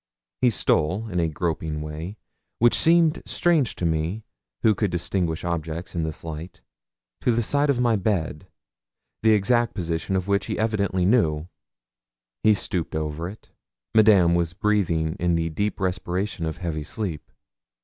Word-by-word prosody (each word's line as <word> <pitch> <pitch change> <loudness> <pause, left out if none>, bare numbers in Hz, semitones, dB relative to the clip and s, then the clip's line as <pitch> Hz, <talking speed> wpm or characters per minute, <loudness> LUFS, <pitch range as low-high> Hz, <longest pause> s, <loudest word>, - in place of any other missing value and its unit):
He 125 - +5
stole, 100 -1 +1
in 90 -2 -1
a 85 - +2
groping 80 -1 -2
way, 80 +7 -6 0.4
which 120 +1 +4
seemed 165 -1 +4
strange 160 -8 +2
to 85 - -3
me, 80 +6 -1 0.4
who 110 - +5
could 105 0 0
distinguish 90 -1 -1
objects 85 0 -3
in 85 - -1
this 80 -1 -4
light, 80 +2 -7 0.6
to 125 - +2
the 120 0 +1
side 145 +5 +1
of 135 -3 +2
my 120 -2 +3
bed, 90 -4 -1 0.7
the 110 0 +5
exact 120 +3 +2
position 85 0 -2
of 95 0 -1
which 100 -2 +1
he - - -2
evidently 100 -4 0
knew; 85 -8 +2 0.9
he 110 -1 +5
stooped 90 -5 -3
over 80 +2 -3
it. 105 - -14 0.4
Madame 105 -6 +6
was 85 -1 +1
breathing 90 -6 +1
in 85 -1 +2
the 80 0 -1
deep 100 +7 -2
respiration 95 -1 -2
of 80 - -4
heavy 80 -4 -3
sleep. 85 -1 -5
90 Hz, 155 wpm, -24 LUFS, 80-110 Hz, 0.9 s, Madame